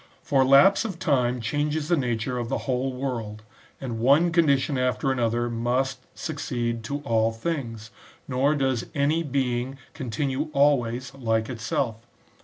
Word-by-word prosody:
For 135 -2 +3
lapse 140 +12 +6
of 205 -7 -4
time 125 -8 +1
changes 145 +6 -1
the 175 - +3
nature 125 -2 -1
of 120 -1 -4
the - - 0
whole 130 0 0
world, 120 -5 -4 0.4
and 120 -4 -4
one 145 +8 +4
condition 150 -4 +2
after 125 +1 +1
another 120 -2 0
must 125 +3 -1 0.2
succeed 120 -7 -3
to 145 +4 -3
all 115 -4 +1
things, 115 -4 -4 0.4
nor 140 +3 +2
does 130 -4 0
any 145 +3 +2
being 130 -3 -1 0.2
con* 130 -5 -6
tinue 140 +5 -1
always 130 -3 +2
like 115 -4 -1
itself. 115 -1 -2
130 Hz, 145 wpm, -25 LUFS, 120-140 Hz, 0.4 s, lapse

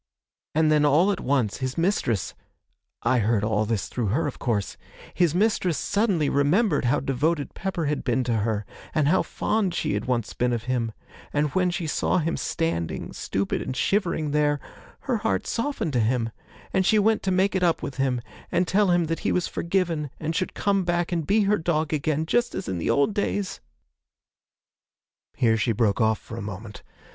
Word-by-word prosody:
And 155 0 +4
then 150 -1 +4
all 155 +7 +4
at 195 - -2
once, 125 -6 0
his 130 +2 -3
mistress 165 - 0 0.7
I 125 +1 +3
heard 105 -1 +1
all 110 0 +1
this 110 -2 -1
through 120 -4 -2
her, 125 +12 +1
of 145 - -4
course 105 -5 -1 0.4
his 175 -3 +2
mistress 185 -4 +2
suddenly 200 -7 +1
remembered 145 - +2
how 120 - +2
devoted 140 +3 0
Pepper 185 -3 -3
had 145 0 -1
been 125 0 +1
to 120 -2 0
her, 105 -1 -1 0.3
and 155 -3 +3
how 185 +3 +4
fond 210 -5 -1
she - - -1
had 100 +1 -2
once 120 -4 -1
been 125 0 0
of 115 -1 -2
him, 120 -2 -1 0.4
and 145 0 +1
when 185 -1 +2
she 175 -1 -3
saw 155 - +1
him 165 -1 0
standing, 165 - -2
stupid 100 0 -2
and 130 - -4
shivering, 170 -6 0
there, 145 -1 +2 0.4
her 250 -4 0
heart 225 +1 -1
softened 230 - -2
to 125 - +2
him, 115 0 +1 0.4
and 190 - +3
she 215 +3 +4
went 215 +1 +3
to 195 - -1
make 190 +2 +2
it 190 - 0
up 170 -2 +2
with 135 - -5
him, 130 -3 0 0.3
and 180 0 +2
tell 200 +1 +3
him 175 -1 +3
that 165 +1 -2
he - - 0
was 180 - +1
forgiven 170 -4 -1
and 160 +1 -2
should 185 - -2
come 200 -1 +1
back 175 0 0
and 165 -4 -1
be 215 +2 +4
her 205 +1 +2
dog 160 -2 0
again, 155 +1 0
just 240 +8 +1
as - - -4
in 95 -2 -2
the - - -1
old 140 +9 +3
days! 205 -1 -2 0.9
' - - -69
Here 115 -2 +3
she 110 +1 +1
broke 110 0 +1
off 110 0 +3
for 115 - -10
a - - -4
moment. 100 +1 -7
150 Hz, 195 wpm, -25 LUFS, 120-180 Hz, 0.9 s, And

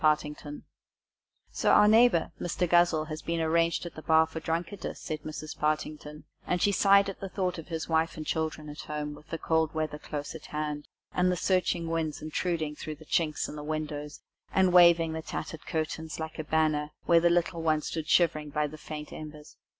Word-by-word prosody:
BAILED 155 -1 +4 0.2
OUT 145 - -5 1.0
"So, - - 0
our 210 - +7
neighbour, 220 -6 +5
Mr. 175 +1 -1
Guzzle, 175 -2 +4
has 155 0 -6
been 170 0 -2
arranged 165 +1 +1
at 170 - -7
the 155 - -9
bar 160 0 +5
for 160 0 -6
drunkardice," 165 +5 -3
said 155 -2 -5
Mrs. 155 0 -6
Partington; 150 0 -2 0.2
and 180 - +1
she 205 - +3
sighed 200 0 +5
as 195 - -5
she 195 - -3
thought 180 -2 -2
of 160 - -9
his 165 -2 -4
wife 160 0 +1
and 155 - -5
children 160 -1 -2
at 150 +1 -9
home, 150 -1 -4
with 150 - -14
the 165 - -3
cold 160 -1 0
weather 155 -1 -2
close 145 -1 -5
at 160 - -10
hand, 150 -1 -4 0.3
and 180 0 +2
the 180 - -1
searching 180 -2 +1
winds 165 -2 -2
intruding 155 -1 -2
through 155 +1 -6
the 155 +1 -15
chinks 155 -1 0
in - - -8
the 150 - -6
windows, 150 -1 -4 0.3
and 185 -2 +3
waving 170 -2 +6
the 160 - -3
tattered 160 0 -6
curtain 160 -1 -3
like 160 0 -6
a - - -1
banner, 155 -1 +1 0.2
where 170 -1 +6
the 170 +1 +4
little 170 0 +1
ones 155 -2 +1
stood 160 -2 -4
shivering 155 -4 +3
by 150 +1 0
the 155 +1 -7
faint 150 -1 -7
embers. 150 -1 -10
160 Hz, 205 wpm, -29 LUFS, 150-170 Hz, 1.0 s, our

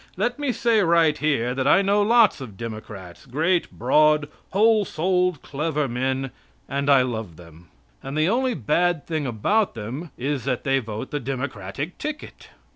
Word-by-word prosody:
Let 245 +3 -1
me 285 -3 0
say 230 -2 +2
right 165 -4 +4
here 140 -6 0
that 130 +1 -1
I 195 +6 +5
know 200 +1 +2
lots 230 - +4
of 110 -7 -9
Democrats, 110 -4 -8
great, 165 +7 0
broad, 150 +4 +3 0.2
whole 215 +2 +4
souled, 180 -2 0
clever 150 0 -2
men, 130 +2 -2 0.4
and 140 +1 -2
I 135 -2 +6
love 110 -8 -4
them. 85 0 -15 0.3
And 135 +2 -6
the 155 +1 +3
only 250 +4 +1
bad 170 +6 0
thing 155 -4 -2
about 190 - 0
them 125 +10 -6
is 135 +1 -2
that 125 -3 -1
they 135 0 +2
vote 110 -3 -6
the 145 - -2
Democratic 140 +4 -5
ticket. 300 0 -7
145 Hz, 165 wpm, -23 LUFS, 125-180 Hz, 0.4 s, I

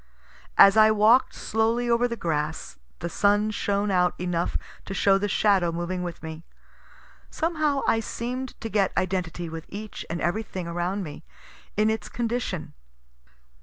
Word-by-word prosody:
As 200 +2 +8
I 215 0 +8
walk'd 220 +4 +4
slowly 225 +2 0
over 235 +1 +3
the 235 - -4
grass, 150 - -3 0.2
the 170 - -2
sun 205 +4 +2
shone 205 -1 0
out 180 -1 +2
enough 175 -1 -1 0.3
to 195 - -5
show 195 0 +4
the 205 - 0
shadow 195 -4 +2
moving 175 +2 -3
with 175 -2 -6
me. 160 0 -7 0.9
Somehow 310 -4 0
I 225 - +3
seem'd 250 +3 -5
to 225 - -3
get 200 -3 +1
identity 180 -2 -1
with 160 0 -7
each 210 +1 -7
and 170 - -3
every 175 +7 0
thing 185 -5 -6
around 175 +4 -2
me, 150 -4 -8 0.5
in 215 +1 +3
its 220 - -4
condition. 235 -7 -3
200 Hz, 155 wpm, -26 LUFS, 175-225 Hz, 0.9 s, As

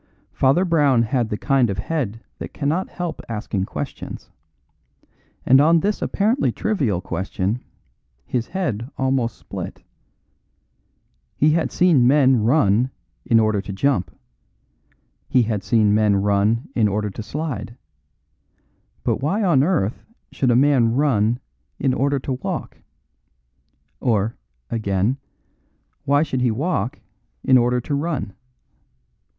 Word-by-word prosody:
Father 140 +8 +2
Brown 145 -8 +3
had 115 0 0
the 105 - -2
kind 135 -2 +2
of 100 - -3
head 115 -2 -3 0.2
that - - -8
cannot 155 +6 -1
help 175 -3 -5
asking 105 -3 -2
questions; - - -7 1.1
and 130 +2 +6
on 165 +2 +4
this 205 +4 -1
apparently 225 +7 +1
trivial 135 - -1
question 95 +5 -3 0.6
his 120 -2 -2
head 125 - -3
almost 130 -4 0
split. - - -8 1.5
He 150 +2 +3
had 160 +1 0
seen 160 -9 +4
men 130 -3 +4
run 120 -1 +3 0.4
in 115 -3 +4
order 110 -2 +2
to 100 - -7
jump. 100 -1 0 1.2
He 125 - +4
had 110 -3 -2
seen 105 0 +3
men 105 -1 +3
run 100 +4 +1
in 110 -3 +3
order 105 0 -1
to 105 - -7
slide. 130 0 -5 1.3
But - - +1
why 195 +10 0
on 170 -9 +4
earth 140 - 0 0.3
should 130 - 0
a 120 - +4
man 125 -4 +3
run 120 -5 +2 0.4
in 135 -2 +1
order 140 +2 +1
to 135 - -3
walk? - - -4 1.2
Or, 110 -2 0 0.4
again, 105 +2 0 0.9
why 145 +2 +3
should 130 -5 -2
he 125 - +3
walk 125 - -1 0.5
in 130 - +4
order 125 0 +3
to 145 - -4
run? 140 - -2
125 Hz, 125 wpm, -21 LUFS, 110-145 Hz, 1.5 s, and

